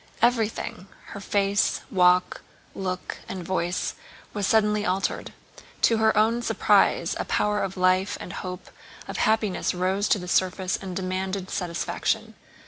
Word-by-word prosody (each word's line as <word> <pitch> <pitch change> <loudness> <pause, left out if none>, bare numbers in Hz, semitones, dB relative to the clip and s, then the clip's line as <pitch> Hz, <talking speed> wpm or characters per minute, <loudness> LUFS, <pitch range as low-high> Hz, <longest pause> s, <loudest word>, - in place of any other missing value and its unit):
Everything: 225 -5 0 0.2
her - - -7
face, 200 0 +1
walk, 180 -1 +3 0.3
look, 185 -1 -4
and 185 -2 -5
voice, 180 -1 -1 0.4
was 205 -2 -1
suddenly 210 -2 +3
altered. 190 0 -1 0.5
To 230 - +5
her 220 -1 +3
own 225 +3 +3
surprise - - +3
a - - -2
power 210 0 +1
of 195 0 -3
life 185 +1 +2
and 180 - -7
hope 180 0 -7 0.4
of - - -5
happiness 215 -4 +1
rose 190 +3 0
to - - +3
the 180 -2 -7
surface 185 +1 +1
and 190 -2 -6
demanded 190 0 -3
satisfaction. 175 -2 -2
190 Hz, 135 wpm, -25 LUFS, 185-210 Hz, 0.5 s, To